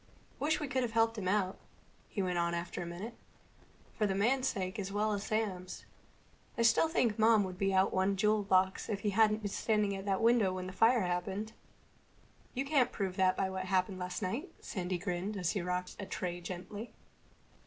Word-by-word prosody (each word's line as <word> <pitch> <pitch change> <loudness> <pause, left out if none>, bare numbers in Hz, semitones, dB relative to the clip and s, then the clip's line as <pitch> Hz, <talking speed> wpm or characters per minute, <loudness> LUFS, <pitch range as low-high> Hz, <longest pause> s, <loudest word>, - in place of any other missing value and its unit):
"Wish 310 +2 +1
we 295 - -3
could 260 0 0
have 235 -2 -2
helped 225 0 +3
him 185 - -3
out," 190 -1 +1 0.5
he 200 - -2
went 180 -1 0
on 170 0 +1
after 170 0 -4
a 175 - -4
minute. 185 +7 -6 0.8
"For 210 - +1
the 190 - -1
man's 255 +6 +2
sake 190 -1 -2
as 195 -1 -3
well 210 +1 +1
as 200 -1 -2
Sam's. 200 -5 -3 0.7
I 235 - +2
still 230 +7 +5
think 235 -9 +1
Mom 220 -1 +5
would 185 -1 -6
be 195 0 +2
out 190 0 +3
one 190 +1 +2
jewel 210 +2 +2
box 190 0 +2
if 200 -2 -2
he 205 - 0
hadn't 215 +1 +3
been 205 - -2
standing 210 -2 +1
at 195 0 -6
that 195 -1 +1
window 225 -5 +3
when 185 0 -4
the 185 - -6
fire 230 +5 +4
happened." 190 +4 -2 1.0
"You 265 +2 -1
can't 275 -4 +3
prove 190 -3 -3
that 185 -1 +3
by 190 -1 0
what 190 0 -3
happened 185 0 0
last 180 +3 -4
night." 235 - -3
Sandy 185 -2 -3
grinned 185 +3 -3
as 180 -3 0
he 195 - -1
rocked 180 +1 -3
a 200 - -5
tray 175 -1 -4
gently. 185 +6 -7
195 Hz, 205 wpm, -33 LUFS, 185-220 Hz, 1.0 s, still